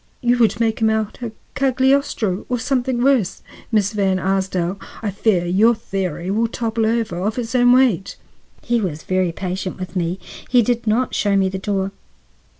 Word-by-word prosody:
You 245 -1 +2
would 220 -2 +3
make 225 -1 +1
him 220 - +4
out 220 -1 -1
a 235 -2 -4 0.2
Cagliostro 260 -6 +1
or 250 - 0
something 250 0 0
worse. 250 -9 +2 0.3
Miss 210 -2 +2
Van 195 -2 +1
Arsdale, 190 -1 -1 0.2
I 205 - -1
fear 195 -2 +1
your 210 +7 +4
theory 190 -4 -3
will 225 +3 +1
topple 225 -1 -1
over 225 -6 0
of 210 +5 -2
its 235 -1 -3
own 245 -1 +5
weight." 245 -7 +3 0.5
He 240 -1 +1
was 160 -6 -3
very 185 -2 0
patient 185 +1 -4
with 185 +1 -7
me; 175 +1 -1 0.3
he 245 -2 +5
did 235 +1 -1
not 235 +4 +1
show 205 -1 +1
me 190 -1 +3
the 190 0 -4
door. 195 0 -1
215 Hz, 175 wpm, -20 LUFS, 190-240 Hz, 0.5 s, own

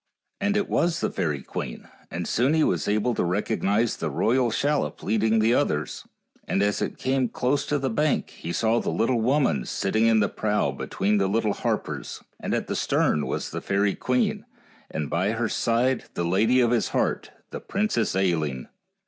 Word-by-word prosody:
And 205 +1 +1
it 205 - 0
was 170 0 +1
the - - -1
fairy 75 -5 -2
queen, - - -6 0.2
and - - -4
soon 130 +6 +2
he 160 - +3
was 85 - 0
able 105 +4 +1
to - - 0
recognize 105 +4 0
the - - -3
royal 125 +1 +2
shallop 145 +6 -1
leading 110 +1 +2
the 110 +2 +3
others, 75 - -1 0.4
and 100 - +1
as 105 0 0
it - - -2
came 130 -2 0
close 140 +3 0
to 145 - +1
the 135 -1 -1
bank 150 +4 0
he 85 - -7
saw 115 +5 +2
the - - -2
little 115 0 +1
woman 125 - +2
sitting 110 - 0
in 115 -1 +4
the 100 - +3
prow 105 0 0
between 105 +2 -1
the 95 - +2
little 105 +1 +1
harpers, - - -3 0.2
and - - -2
at - - -1
the - - -3
stern 75 - +1
was - - -3
the - - -4
fairy 100 0 +1
queen, 125 0 0 0.5
and 75 -2 -3
by 95 +8 0
her 115 0 0
side 120 +4 +1
the 85 - -1
lady 110 +9 +3
of 120 -1 +3
his 120 -2 +2
heart, - - -1 0.2
the - - -5
Princess 195 - -1
Ailinn. 80 -9 0
110 Hz, 190 wpm, -25 LUFS, 100-130 Hz, 0.5 s, in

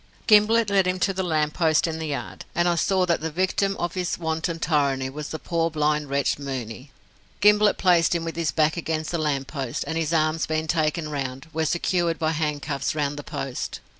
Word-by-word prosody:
Gimblett 215 0 +5
led 195 -2 +3
him 185 0 0
to 195 - +2
the 190 - -2
lamp 155 -4 0
post 160 -3 +2
in 160 -1 -3
the 160 - -3
yard, 145 -2 -5
and 175 +1 +2
I 175 - +3
saw 185 +2 +2
that 170 -3 0
the 160 - -2
victim 190 +4 0
of 175 -1 -2
his 180 -1 -2
wanton 160 0 -2
tyranny 140 -5 0
was 150 +1 -6
the 155 - -4
poor 165 +1 -1
blind 150 -2 0
wretch 140 0 0
Mooney. 130 -2 -6 0.5
Gimblett 210 0 +5
placed 175 -2 +3
him 170 - -1
with 165 -1 -4
his 165 -2 0
back 155 +1 +1
against 160 -1 -2
the 170 - -1
lamp 145 -3 0
post, 135 -3 -4
and 160 +3 -2
his 160 -1 -1
arms 155 0 +1
being 155 0 -1
taken 155 -1 0
round, 135 0 -5
were 160 0 0
secured 170 0 0
by 160 -1 0
handcuffs 150 -3 -2
round 145 -1 -1
the 145 - -7
post. 135 -2 -5
160 Hz, 210 wpm, -24 LUFS, 150-175 Hz, 0.5 s, Gimblett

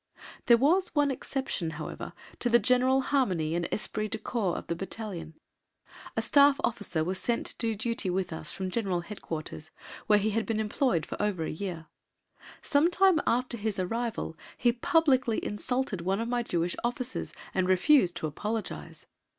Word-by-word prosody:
There 235 - +8
was 340 +10 +2
one 290 -1 +3
exception, 265 -10 -3
however, 155 - -6 0.3
to 245 - 0
the 235 - +7
general 255 +3 +3
harmony 190 - +1
and 170 0 0
esprit 215 0 -1
de 220 - -3
corps 215 -5 -1
of - - -6
the 170 - -2
battalion. 180 -4 -6 0.8
A - - +1
Staff 285 -1 +5
officer 185 -8 -1
was 185 +3 -2
sent 235 +4 -1
to - - -1
do 225 -2 +1
duty 220 -2 -2
with 180 -1 -1
us 160 0 -3
from 190 -1 -4
G.H.Q., 180 -6 -3 0.5
where 210 -1 +6
he 210 +1 +1
had 225 +1 -1
been 225 -1 0
employed 210 - +1
for - - -5
over 205 -5 0
a - - -3
year. 170 -1 -5 0.8
Some 295 +3 +3
time 365 -3 +4
after 245 0 +1
his 215 -1 -2
arrival 225 -1 -2 0.2
he 240 - +3
publicly 260 -2 +2
insulted 225 -1 -1
one 190 +4 0
of 230 - -2
my 240 0 0
Jewish 175 -6 -1
officers 250 +1 -2 0.2
and 185 -1 +1
refused 185 - +4
to - - -3
apologise. 210 +8 -4
220 Hz, 165 wpm, -29 LUFS, 180-250 Hz, 0.8 s, There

